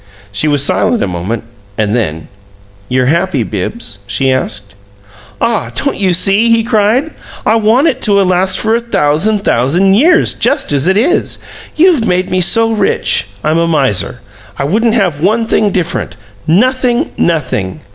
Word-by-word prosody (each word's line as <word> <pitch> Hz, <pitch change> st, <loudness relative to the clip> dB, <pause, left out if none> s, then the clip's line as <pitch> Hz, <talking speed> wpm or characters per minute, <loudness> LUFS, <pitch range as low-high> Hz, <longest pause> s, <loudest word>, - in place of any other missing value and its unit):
She 100 Hz, +9 st, -1 dB
was 145 Hz, -2 st, +2 dB
silent 240 Hz, -, +1 dB
a -, -, -1 dB
moment, 95 Hz, +6 st, -4 dB, 0.3 s
and 110 Hz, 0 st, 0 dB
then, 80 Hz, -9 st, -3 dB, 0.6 s
"You're 125 Hz, 0 st, +1 dB
happy, 160 Hz, -2 st, 0 dB
Bibbs?" 105 Hz, -, -5 dB
she 135 Hz, -1 st, 0 dB
asked. 105 Hz, -6 st, -3 dB, 0.7 s
"Ah, 230 Hz, -3 st, -1 dB
don't 280 Hz, -, -1 dB
you 190 Hz, -2 st, +1 dB
see?" 195 Hz, +6 st, +3 dB
he 230 Hz, 0 st, +3 dB
cried. 230 Hz, +6 st, +1 dB, 0.3 s
"I 225 Hz, -, +3 dB
want 225 Hz, +6 st, +2 dB
it 260 Hz, -5 st, 0 dB
to 210 Hz, -, +2 dB
last 185 Hz, -1 st, +2 dB
for 220 Hz, +1 st, 0 dB
a 230 Hz, -, +2 dB
thousand, 205 Hz, -1 st, 0 dB
thousand 170 Hz, +11 st, +2 dB
years, 320 Hz, -, +3 dB
just 275 Hz, -, 0 dB
as 140 Hz, +3 st, +1 dB
it 190 Hz, +1 st, +2 dB
is! 305 Hz, -, 0 dB, 0.4 s
You've 315 Hz, -8 st, +3 dB
made 180 Hz, 0 st, 0 dB
me 185 Hz, 0 st, +1 dB
so 225 Hz, +5 st, +3 dB
rich, 205 Hz, -, +1 dB, 0.2 s
I'm 155 Hz, +2 st, +1 dB
a 170 Hz, -, +1 dB
miser. 135 Hz, -, 0 dB, 0.4 s
I -, -, -2 dB
wouldn't 220 Hz, +10 st, +1 dB
have 180 Hz, -10 st, 0 dB
one 220 Hz, +6 st, +1 dB
thing 215 Hz, -2 st, +1 dB
different 185 Hz, -4 st, -3 dB, 0.3 s
nothing, 250 Hz, -, +1 dB
nothing!" 130 Hz, -, -1 dB
190 Hz, 160 wpm, -12 LUFS, 140-230 Hz, 0.7 s, see